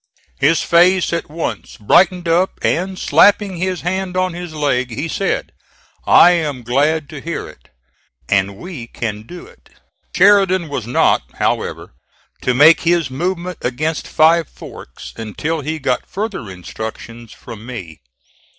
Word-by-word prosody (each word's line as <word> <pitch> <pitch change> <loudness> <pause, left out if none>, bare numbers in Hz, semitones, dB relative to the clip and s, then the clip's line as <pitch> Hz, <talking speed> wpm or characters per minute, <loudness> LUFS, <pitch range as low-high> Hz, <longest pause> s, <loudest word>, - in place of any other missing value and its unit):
His 150 +3 +3
face 175 +1 +3
at 170 - -3
once 160 +2 -5
brightened 175 - +3
up, 175 +3 +1
and 185 +2 0
slapping 200 -2 +3
his 185 0 -2
hand 185 +1 -3
on 185 -1 0
his 175 -1 -7
leg 135 -4 0
he 135 +8 -4
said: 195 +4 -2 0.6
"I 175 - +7
am 150 -7 -1
glad 145 +5 +1
to 150 -3 -8
hear 170 +2 -5
it, - - -16 0.6
and 100 0 0
we 150 - -8
can 110 -2 -5
do 180 - -10
it." 475 +4 -20 0.5
Sheridan 190 -3 +4
was 130 -6 -4
not 125 - +3
however - - -2 0.5
to 125 - +1
make 155 +5 +7
his 170 -5 +1
movement 180 +4 -3
against 155 +6 -2
Five 160 0 +3
Forks 65 - -11
until 150 +9 -3
he 155 +3 -3
got 130 -4 -2
further 195 - -4
instructions 110 +5 -8
from 110 -2 -11
me. 90 -11 -8
160 Hz, 140 wpm, -18 LUFS, 125-180 Hz, 0.6 s, I